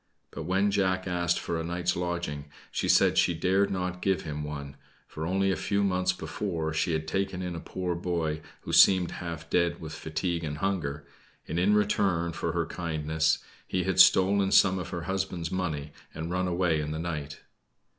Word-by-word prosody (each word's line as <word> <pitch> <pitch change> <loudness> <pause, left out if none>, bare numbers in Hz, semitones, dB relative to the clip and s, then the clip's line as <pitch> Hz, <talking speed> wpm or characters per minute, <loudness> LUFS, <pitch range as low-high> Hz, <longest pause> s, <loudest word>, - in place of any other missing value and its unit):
But - - -6
when 95 +3 +2
Jack 95 -2 +1
asked 85 -1 +1
for 85 -1 -3
a - - -3
night's 85 +1 -1
lodging, 85 -5 -3 0.3
she - - -1
said - - +5
she 85 - +3
dared 95 +4 +2
not 90 -1 -3
give 95 -1 +1
him 75 -1 -4
one, 70 -2 -6 0.3
for 80 +1 -5
only 95 +2 +2
a - - +1
few 100 0 0
months 90 -1 +2
before 80 -2 -3
she 80 +1 0
had 80 0 -2
taken 95 +1 -2
in 90 -1 -4
a - - -4
poor 90 +1 -3
boy 85 -3 -2 0.2
who - - -6
seemed 95 -3 +6
half 85 -2 -6
dead 85 0 +1
with 80 -2 -7
fatigue 80 +2 -3
and 75 -2 -3
hunger, 75 -6 -2 0.4
and 80 - -2
in 100 +4 +4
return 95 -5 +1
for - - -2
her - - 0
kindness, 80 -1 -1 0.2
he - - 0
had - - 0
stolen 95 +1 +6
some 95 -1 +5
of 90 - -5
her 85 -2 -4
husband's 95 -2 -2
money 80 -6 -2 0.2
and 80 +2 -4
run 90 0 0
away 85 -3 +1
in 75 - -4
the 75 - -3
night. 75 -3 -5
85 Hz, 190 wpm, -28 LUFS, 80-95 Hz, 0.4 s, seemed